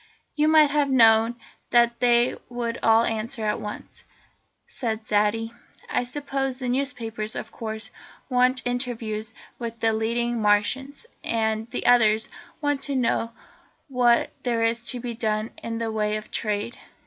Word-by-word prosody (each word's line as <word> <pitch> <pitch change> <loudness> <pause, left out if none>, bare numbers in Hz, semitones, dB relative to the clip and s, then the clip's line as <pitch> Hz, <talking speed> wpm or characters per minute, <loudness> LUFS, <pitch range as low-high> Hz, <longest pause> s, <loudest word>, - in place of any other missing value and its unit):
"You 300 0 +2
might 310 -2 +6
have 290 -1 +2
known 225 -2 +5 0.3
that 235 0 +3
they 240 0 +3
would 235 -1 -3
all 225 0 +5
answer 225 0 -2
at 210 - -1
once," 210 - -8 0.6
said 225 -3 -4
Zaidie. 210 +2 +1 0.4
"I 245 - +1
suppose 270 -1 -3
the 255 -2 -3
newspapers, 240 -5 -1
of 220 - -6
course, 220 0 -5 0.4
want 250 0 +2
interviews 230 -3 -2 0.2
with 230 -1 -5
the 225 -1 +2
leading 235 +1 -1
Martians, 230 - +1 0.2
and 220 0 -1
the - - -4
others 220 -3 +4 0.3
want 290 -2 0
to 280 - -1
know 230 -2 0 0.6
what 245 -2 +3
there 235 -2 0
is 230 +1 0
to 250 - -2
be 240 0 -4
done 220 -1 -2
in 230 0 -4
the 225 -1 -2
way 210 -1 0
of 215 - -10
trade. 210 +1 -2
230 Hz, 150 wpm, -25 LUFS, 220-250 Hz, 0.6 s, might